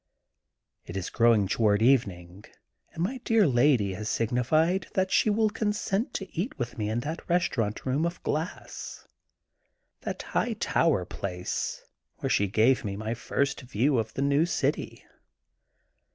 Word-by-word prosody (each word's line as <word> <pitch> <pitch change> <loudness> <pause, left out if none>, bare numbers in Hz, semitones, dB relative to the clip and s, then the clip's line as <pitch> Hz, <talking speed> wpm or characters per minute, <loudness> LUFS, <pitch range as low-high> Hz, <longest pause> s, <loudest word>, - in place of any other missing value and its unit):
It 85 - -5
is 95 - -4
growing 115 -4 +4
toward 105 +1 +2
evening 100 -7 +1 0.5
and 165 - -3
my 255 +8 -2
dear 225 -3 +3
lady 125 - +3
has 105 +3 -4
signified 155 - +1
that 190 0 +1
she - - +3
will 215 0 +2
consent 210 +1 -1
to 195 -2 -5
eat 190 - -3
with 120 -2 -4
me 105 -1 -2
in 115 +2 -1
that 160 +7 -6
restaurant 125 -12 0
room 135 +4 +1
of 170 - -7
glass, 155 +4 -4 0.9
that - - -5
high 240 - -1
tower 165 - +1
place, 90 -1 -4 0.3
where - - -2
she 100 - +3
gave 110 +6 +3
me 100 -2 -3
my 110 +2 -3
first 135 +4 -1
view 130 +1 +1
of 110 -1 -3
the 135 - 0
new 140 +4 +3
city. 150 -4 -2
130 Hz, 150 wpm, -27 LUFS, 105-170 Hz, 0.9 s, growing